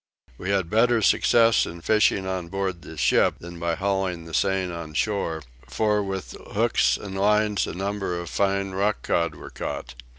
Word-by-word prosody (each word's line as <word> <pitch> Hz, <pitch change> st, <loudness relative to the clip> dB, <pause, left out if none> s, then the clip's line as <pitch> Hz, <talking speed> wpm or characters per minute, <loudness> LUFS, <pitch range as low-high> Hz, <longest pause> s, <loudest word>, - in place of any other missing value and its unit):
We 95 Hz, -, -4 dB
had 95 Hz, -3 st, +1 dB
better 115 Hz, +3 st, +3 dB
success 115 Hz, +3 st, +4 dB
in 85 Hz, 0 st, -8 dB
fishing 105 Hz, -1 st, +2 dB
on 95 Hz, -2 st, -3 dB
board 95 Hz, -1 st, -3 dB
the 80 Hz, -, -11 dB
ship 60 Hz, -3 st, +3 dB
than 85 Hz, 0 st, -10 dB
by 85 Hz, 0 st, -1 dB
hauling 95 Hz, -3 st, -1 dB
the 80 Hz, -, -11 dB
seine 95 Hz, -1 st, +1 dB
on 80 Hz, -2 st, -7 dB
shore; 85 Hz, -7 st, -1 dB, 0.2 s
for 105 Hz, -1 st, +1 dB
with 95 Hz, -2 st, -5 dB, 0.2 s
hooks -, -, +3 dB
and 95 Hz, -2 st, -8 dB
lines 105 Hz, 0 st, +2 dB
a -, -, -5 dB
number 95 Hz, -2 st, -2 dB
of 85 Hz, -, -6 dB
fine 100 Hz, +2 st, 0 dB
rock 100 Hz, +3 st, 0 dB
cod 85 Hz, 0 st, 0 dB
were -, -, -10 dB
caught. -, -, -5 dB
95 Hz, 175 wpm, -25 LUFS, 85-100 Hz, 0.2 s, success